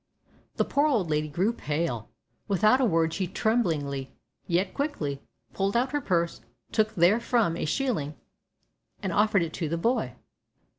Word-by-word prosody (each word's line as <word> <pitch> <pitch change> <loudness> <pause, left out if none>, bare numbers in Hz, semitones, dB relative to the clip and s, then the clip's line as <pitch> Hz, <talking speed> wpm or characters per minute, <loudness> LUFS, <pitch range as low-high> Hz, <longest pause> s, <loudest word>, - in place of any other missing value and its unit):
The - - +1
poor 285 +2 +2
old 210 - +1
lady 150 0 +1
grew 185 +10 0
pale. 150 - -2 0.4
Without 215 +5 +4
a - - +4
word 165 -5 +2
she 185 0 -1
tremblingly, 155 - 0 0.4
yet 185 +2 +1
quickly, 155 - -2 0.3
pulled 195 +3 0
out 255 +2 +1
her 290 0 0
purse, 170 -7 0 0.3
took 215 -1 +1
therefrom 210 +1 +3
a 170 - -2
shilling, 155 - -1 0.9
and 185 - -1
offered 210 -2 +3
it 160 -1 -5
to 165 -4 -3
the 165 - -1
boy. 235 +9 0
185 Hz, 150 wpm, -27 LUFS, 160-230 Hz, 0.9 s, Without